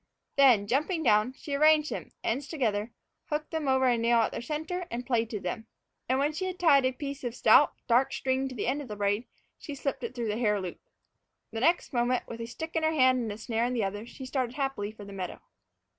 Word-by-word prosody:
Then, 255 -8 +6
jumping 305 - 0
down, 215 0 +3
she 285 +2 -7
arranged 305 +1 +4
them, - - -5
ends 265 +5 -1
together, 225 -7 -1 0.3
hooked 300 0 -3
them 320 -3 -2
over 265 0 +3
a 245 -2 +3
nail 235 +1 +3
at 225 - 0
their - - -5
center, 315 +7 -4
and 245 +1 -4
plaited 225 -5 -1
them. 220 +5 -4 0.4
And 260 - +3
when 290 +3 +1
she 375 +5 -3
had 370 -1 -4
tied 285 -7 +5
a - - 0
piece 280 +1 -6
of 240 -1 -3
stout, 255 +5 +5
dark 250 +2 +3
string 265 0 -1
to 260 - -7
the 215 - -2
end 275 +4 0
of 280 - -8
the 210 - -6
braid, 205 +3 0 0.3
she 290 - -7
slipped 275 0 -3
it - - -5
through 235 -3 -2
the 210 +2 -2
hair 210 -4 +2
loop. 185 -2 -6 0.7
The 225 - -4
next 330 +4 +2
moment, 245 +1 +1
with 230 0 -7
a 230 - -4
stick 320 +8 -7
in 325 - +2
one 315 0 +2
hand 255 -2 +4
and 230 - -3
the 205 - -5
snare 225 +1 -1
in 250 - -1
the 235 -3 0
other, 205 +3 -4
she 260 +2 -9
started 255 -2 -2
happily 270 -7 -2
for 215 -2 -11
the 200 - -10
meadow. 185 -2 -5
255 Hz, 240 wpm, -29 LUFS, 225-285 Hz, 0.7 s, Then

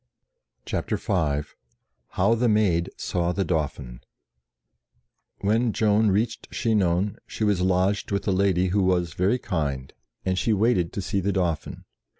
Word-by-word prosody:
CHAPTER - - -2
V 75 -5 0 0.8
HOW 100 +5 +4
THE 115 +1 +2
MAID 95 -6 +2
SAW 85 -1 -1
THE 95 0 -1
DAUPHIN 70 -7 -3 1.4
WHEN 110 +3 +1
Joan 105 0 +3
reached 105 +5 -1
Chinon, 100 -4 0
she - - -4
was 105 -4 +2
lodged 95 +2 +1
with 100 +1 -2
a - - +3
lady 95 -1 +2
who 100 +3 +1
was 90 -3 +1
very 95 +9 +1
kind, 75 - -3 0.3
and 95 0 0
she 115 - +1
waited 105 -5 +2
to 100 - -3
see 100 +1 -1
the 100 +2 0
.Dauphin. 90 -5 -2
95 Hz, 145 wpm, -25 LUFS, 85-105 Hz, 1.4 s, HOW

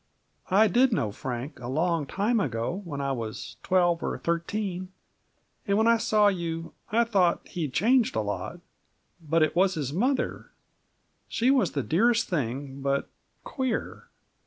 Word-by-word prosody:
I 205 +4 +5
did 250 +4 +4
know 125 - 0
Frank, 125 +5 -5
a 120 - -7
long 160 +2 0
time 215 - +1
ago, 130 - -2
when 145 -4 -5
I 140 0 -1
was 115 -4 -5
twelve 175 -2 +2
or - - -2
thirteen, 185 +2 -2 0.8
and 200 0 +2
when 220 - +3
I 230 0 +5
saw 215 -2 +3
you, 165 -4 -2 0.2
I 230 +2 +4
thought 190 -7 +1
he'd 160 -7 -3
changed 245 - +3
a - - +1
lot. - - -4 0.6
But 160 +1 +2
it 155 - 0
was 190 +2 +3
his 145 -3 -3
mother; 255 - -1 0.8
she 245 +3 +2
was 250 - +2
the 140 - -1
dearest 230 - +2
thing, 135 - -3
but 140 0 0 0.3
queer. 260 -4 -3
175 Hz, 155 wpm, -27 LUFS, 145-220 Hz, 0.8 s, I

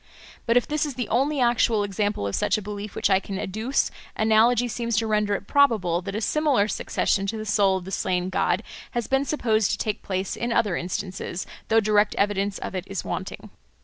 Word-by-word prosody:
But 230 +1 +4
if 245 - +2
this 300 0 0
is 290 -4 -3
the 245 -3 -3
only 275 +5 +1
actual 235 -3 +3
example 205 - -1
of 100 - -3
such - - +1
a - - -4
belief 205 0 -6
which - - +1
I 190 - +5
can 195 0 -6
adduce, 220 +8 -1 0.2
analogy 225 +3 +4
seems 235 -1 -2
to 225 - +2
render 210 -1 +1
it 200 - -6
probable 215 - +3
that 195 +2 -5
a 215 - -2
similar 280 -5 +2
succession 195 -2 0
to 220 - -2
the 215 - -5
soul 200 -2 +3
of 180 - -8
the 190 - -7
slain 180 -1 -1
god 180 +2 +1 0.3
has 240 - 0
been 270 +1 +1
supposed 225 -8 +1
to - - 0
take 215 -2 -2
place 190 0 -3
in 235 0 -3
other 220 -6 +2
instances, 185 0 -4 0.2
though 225 - +4
direct 210 -1 +2
evidence 200 -1 0
of - - -6
it 185 -1 -4
is 195 -2 -4
wanting. - - -5
210 Hz, 210 wpm, -25 LUFS, 195-235 Hz, 0.3 s, I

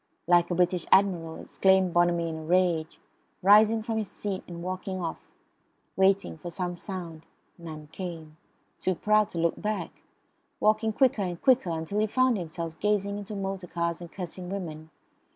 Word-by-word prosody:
like 175 0 +4
a 175 - 0
British 180 -1 +1
Admiral, 175 -5 +3
exclaimed 190 -2 +2
Bonamy 175 -1 +3
in 160 -1 -4
a - - -8
rage, 170 -1 +1 0.4
rising 215 +3 +6
from 225 0 -1
his 215 - -3
seat 200 -2 -4
and 170 -1 -7
walking 185 +1 -4
off; 165 -2 -3 0.8
waiting 190 -3 +2
for 175 - -6
some 175 +1 -3
sound; 175 -4 -7 0.4
none 155 -3 -8
came; 165 -4 -7 0.4
too 185 - 0
proud 215 +3 +3
to - - -8
look 170 0 0
back; 215 0 -3 0.6
walking 215 +1 +2
quicker 245 -2 +2
and 175 -3 -3
quicker 260 -8 +4
until 165 +5 -2
he 215 - +2
found 255 +2 +3
himself 170 -3 -5
gazing 205 -1 0
into 205 +1 -7
motor 195 -2 -4
cars 170 0 -2
and 170 -2 -9
cursing 180 -1 -6
women. 160 -5 -6
180 Hz, 165 wpm, -28 LUFS, 170-200 Hz, 0.8 s, rising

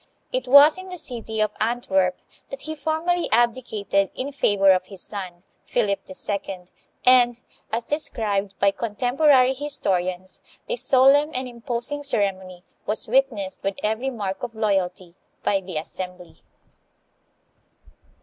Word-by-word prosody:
It 255 0 -2
was 285 +6 +8
in 375 0 -9
the 365 - -6
city 230 -7 -4
of 215 -1 +1
Antwerp 195 -6 +1 0.3
that 275 - -8
he 310 +2 -4
formally 325 +3 -1
abdicated 220 -5 +1
in 270 +2 -4
favor 200 -8 +3
of 185 0 +2
his 195 -3 -6
son, 185 -4 -7 0.2
Philip 200 -5 0
II., 190 0 -4 0.4
and, 245 -1 +5 0.3
as 230 +2 -1
described 205 -9 -1
by 200 0 +3
contemporary 255 +5 +3
historians, 185 -10 -2 0.3
this - - -2
solemn 275 +3 +5
and 255 0 -2
imposing 240 +4 -3
ceremony 190 -8 -2 0.2
was 210 - +1
witnessed 225 -6 0
with 195 0 -2
every 220 +5 0
mark 205 -6 -4
of 240 -2 -6
loyalty 190 -5 -1 0.3
by 195 -1 +1
the 185 -3 -6
assembly. 180 0 -7
220 Hz, 130 wpm, -23 LUFS, 195-260 Hz, 0.4 s, was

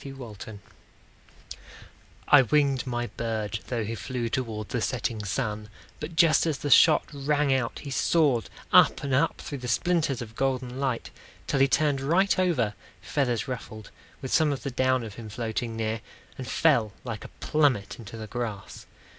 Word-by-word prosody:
Bert 135 -1 -8 0.2
Kessler 110 -2 -8 1.7
I 145 - +8
winged 140 0 +2
my 120 -1 -1
bird, 110 -2 -3
Though 120 -3 -2
he 110 +2 -4
flew 120 +2 -3
toward 110 -4 -3
the 120 - -2
setting 120 -4 -2
sun; 105 0 -3 0.3
But 155 +2 -6
just 165 -1 +4
as 155 -3 0
the 145 - -3
shot 155 +4 +7
rang 145 0 +1
out, 130 -3 -1
he 140 - -6
soared 140 -6 +2 0.2
Up - - +6
and 140 -2 -2
up 150 +5 +2
through 140 - -6
the 125 - -6
splinters 155 +1 +1
of 115 -2 -8
golden 130 -1 -1
light, 130 -4 -2 0.3
Till 140 - 0
he 135 - +5
turned 145 -1 +1
right 175 +6 +2
over, 145 - +1 0.3
feathers 125 -6 -1
ruffled, 110 -4 -7 0.3
With 130 - -3
some 155 -2 +4
of 140 - -4
the 140 - -3
down 130 0 +1
of 110 -3 -7
him 110 - -8
floating 115 +1 -3
near, 110 0 -2 0.3
And - - -7
fell 110 -3 +2
like 115 -4 -5
a - - -8
plummet 140 -11 +1
into 115 0 -9
the 110 - -6
grass. 110 -3 -6
130 Hz, 170 wpm, -27 LUFS, 115-140 Hz, 1.7 s, I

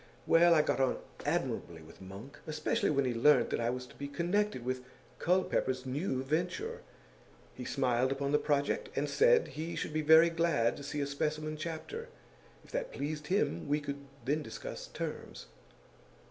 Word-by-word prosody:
Well, 170 +1 +6
I 155 - +5
got - - 0
on 130 -1 +2 0.3
admirably 80 -2 -2
with 80 - -15
Monk, 100 +9 -10
especially 155 +8 0
when 140 -2 +2
he 125 - 0
learnt 145 +6 +4
that - - 0
I 115 0 +1
was 125 +1 -3
to - - -15
be 140 - -5
connected 170 - 0
with 130 0 -2 0.4
Culpepper's 135 -7 +1
new 130 0 -1
venture; 180 - -2 0.7
he 125 - -7
smiled 130 -1 +1
upon 140 +1 -1
the 150 - +4
project, 145 - 0
and - - 0
said 480 0 +4
he 160 +3 -5
should - - -3
be 155 - +1
very 160 +2 +7
glad 165 -9 +2
to 145 - -8
see 145 +1 -3
a - - +1
specimen 155 +2 -2
chapter; 170 - -5 0.6
if - - -16
that - - -2
pleased 150 +1 -4
him, 180 - 0
we 145 +1 +2
could 140 -1 -5 0.2
then 150 +4 +1
discuss - - -7
terms. - - -6
150 Hz, 175 wpm, -32 LUFS, 130-170 Hz, 0.7 s, very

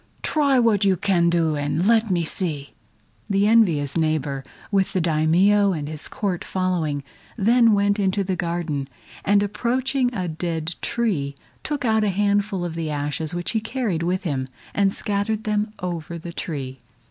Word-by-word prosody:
Try 285 -3 +2
what 225 -4 +3
you 195 -2 +3
can 175 -2 +2
do 165 -2 +2
and 145 +4 -1
let 225 0 +4
me 175 -2 +1
see!" 155 -4 -3 0.6
The 200 0 +3
envious 175 -11 +3
neighbor, 155 -4 0 0.3
with 195 -2 +1
the 185 - +1
Daimio 175 +5 +3
and 150 -3 -4
his 155 0 -6
Court 200 -8 -2
following, 170 -6 -1 0.3
then 230 +2 +5
went 200 0 +2
into 195 0 +1
the 190 0 -1
garden, 170 -5 -2 0.4
and 205 0 +3
approaching 245 +5 0
a 185 -7 -3
dead 165 0 -3
tree, 170 -13 -1 0.3
took 290 -3 -3
out 220 -1 +3
a 210 - +2
handful 200 -1 +1
of 170 - -4
the 165 -1 -3
ashes 150 +2 -2
which 175 0 -2
he 225 - +1
carried 220 -7 -2
with 180 +3 -1
him, 135 -7 -2 0.3
and 200 -1 +2
scattered 205 +2 -2
them 210 -1 0
over 170 -1 -4
the 170 +1 -8
tree. 135 -6 -5
185 Hz, 165 wpm, -23 LUFS, 160-210 Hz, 0.6 s, then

